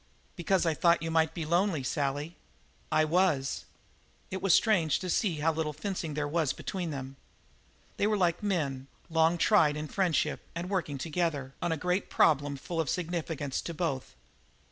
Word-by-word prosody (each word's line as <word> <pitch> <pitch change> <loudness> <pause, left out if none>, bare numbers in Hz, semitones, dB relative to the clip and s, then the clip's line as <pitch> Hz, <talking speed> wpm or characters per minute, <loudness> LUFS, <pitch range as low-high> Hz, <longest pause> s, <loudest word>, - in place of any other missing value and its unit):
"Because 185 0 +1
I 165 - +2
thought 170 +2 +3
you 165 - -2
might 160 -1 +2
be 165 - -3
lonely, 170 -2 +1
Sally." 145 +4 -2 0.6
"I 155 0 +4
was." 155 -5 +1 0.7
It 190 - -3
was 195 - +2
strange 175 - +4
to 185 -1 -3
see 190 -4 +1
how 160 +1 +2
little 155 -1 -2
fencing 165 -1 -4
there 150 -1 -1
was 155 -2 0
between 180 -3 -4
them. 135 -2 -6 0.8
They 205 - +2
were 215 -1 +1
like 175 -3 +1
men, 145 -10 -1 0.2
long 160 +1 +3
tried 160 -6 +4
in 155 0 -4
friendship 165 -4 0 0.2
and 175 +3 -4
working 170 -7 -1
together 150 -3 -2
on 175 - 0
a 160 - 0
great 180 +5 -1
problem 145 -2 +3
full 165 +4 -3
of 155 - -3
significance 165 -5 -2
to 170 - -6
both. 150 -6 -3
165 Hz, 170 wpm, -30 LUFS, 150-180 Hz, 0.8 s, I